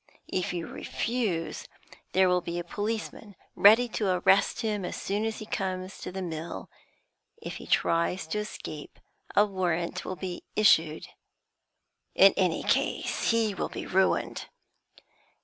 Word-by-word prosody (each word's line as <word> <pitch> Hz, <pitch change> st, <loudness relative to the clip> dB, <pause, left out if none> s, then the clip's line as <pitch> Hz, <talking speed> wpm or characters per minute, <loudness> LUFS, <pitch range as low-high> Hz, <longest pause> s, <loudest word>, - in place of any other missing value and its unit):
If 185 Hz, -, 0 dB
you 175 Hz, -2 st, -3 dB
refuse, 215 Hz, -9 st, -3 dB, 0.5 s
there 190 Hz, 0 st, +5 dB
will 180 Hz, 0 st, +2 dB
be 170 Hz, 0 st, -4 dB
a 175 Hz, -, -2 dB
policeman 210 Hz, +2 st, -4 dB, 0.2 s
ready 225 Hz, +5 st, +7 dB
to 215 Hz, -2 st, -1 dB
arrest 185 Hz, +4 st, +3 dB
him 210 Hz, -4 st, -1 dB
as 180 Hz, -, -4 dB
soon 205 Hz, +3 st, -1 dB
as 225 Hz, -1 st, -2 dB
he 215 Hz, -, -7 dB
comes 185 Hz, -2 st, -4 dB
to -, -, -6 dB
the 190 Hz, +1 st, -4 dB
mill; 160 Hz, -, -6 dB, 0.7 s
if -, -, -6 dB
he -, -, -10 dB
tries 170 Hz, +2 st, +1 dB
to 210 Hz, -, -1 dB
escape, 155 Hz, -7 st, -7 dB, 0.4 s
a 205 Hz, -, +6 dB
warrant 175 Hz, -4 st, -2 dB
will 185 Hz, -, -4 dB
be 185 Hz, -1 st, -5 dB
issued. 165 Hz, -7 st, +4 dB, 1.1 s
In -, -, +7 dB
any -, -, +1 dB
case -, -, 0 dB
he 225 Hz, -2 st, +2 dB
will -, -, -3 dB
be -, -, -6 dB
ruined.' 190 Hz, +1 st, +1 dB
190 Hz, 145 wpm, -28 LUFS, 175-210 Hz, 1.1 s, ready